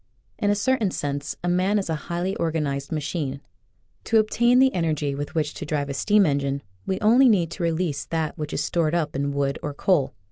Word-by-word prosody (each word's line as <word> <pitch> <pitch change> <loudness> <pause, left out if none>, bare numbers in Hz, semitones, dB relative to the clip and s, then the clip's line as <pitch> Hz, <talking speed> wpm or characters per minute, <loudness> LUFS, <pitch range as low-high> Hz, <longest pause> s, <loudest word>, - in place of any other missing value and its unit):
In 205 - +1
a 205 - +3
certain 225 -1 +1
sense 145 -3 -3
a - - -1
man 185 +4 +2
is 200 - -1
a 165 - -1 0.2
highly 175 +3 -1
organ 160 -2 0
ized 140 0 -4
machine. 150 -3 -3 0.7
To 225 - +3
obtain 235 +3 +3
the 265 0 +5
energy 155 -4 0
with 145 +4 -5
which 150 -2 0
to - - -7
drive 145 -2 -2
a - - -2
steam 205 +8 +3
engine 140 -2 -1 0.2
we 190 - -1
only 245 +5 +6
need 175 -7 +2
to 180 - -7
release 165 -3 -1
that 160 -2 -2
which 150 0 -5
is - - -1
stored 165 -1 0
up 155 -3 -1
in 140 +1 -1
wood 140 -1 -1
or 145 -1 -5
coal. 145 -6 +1
160 Hz, 215 wpm, -24 LUFS, 145-190 Hz, 0.7 s, only